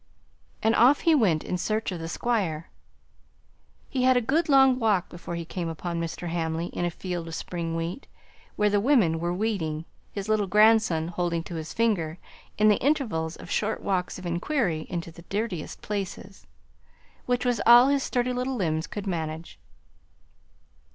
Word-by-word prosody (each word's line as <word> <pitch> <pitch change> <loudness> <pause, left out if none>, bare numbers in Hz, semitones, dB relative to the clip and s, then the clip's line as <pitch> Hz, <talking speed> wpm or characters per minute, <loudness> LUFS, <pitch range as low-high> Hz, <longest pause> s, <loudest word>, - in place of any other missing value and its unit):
And 220 +1 +4
off 250 +6 +5
he 330 - +4
went 195 - +3
in 180 - -3
search 215 +2 -1
of 180 - -5
the 165 - -5
Squire. 180 -7 -1 1.2
He 260 - -2
had 255 0 +5
a - - +5
good 300 +8 0
long 265 -2 +5
walk 210 -6 +1
before 175 0 -7
he 170 0 -4
came 170 0 -4
upon 170 +1 -4
Mr. 170 +1 -4
Hamley 165 0 -2
in 175 - -1
a - - +1
field 175 -1 -5
of 165 - -5
spring 165 -1 -4
wheat, 165 - -4 0.5
where 210 -1 +2
the 205 - +3
women 200 - +3
were 170 +1 -1
weeding, 175 -6 -2 0.3
his 200 0 -5
little 215 -2 +1
grandson 210 -5 +4
holding 170 -1 -1
to 175 - -8
his 160 -1 -5
finger 185 -8 0 0.4
in 215 - +4
the 210 - +4
intervals 225 - 0
of - - -11
short 215 +1 -1
walks 185 -2 -1
of 185 - -9
inquiry 175 - -1
into 170 -2 -4
the 170 - -13
dirtiest 200 -6 -4
places, 195 - -5 0.8
which 245 0 0
was 245 -3 +1
all 240 +3 +8
his 280 -1 +2
sturdy 250 -1 0
little 250 +2 -2
limbs 160 -6 -1
could 205 -1 -6
manage. 160 -3 -4
185 Hz, 170 wpm, -26 LUFS, 165-230 Hz, 1.2 s, all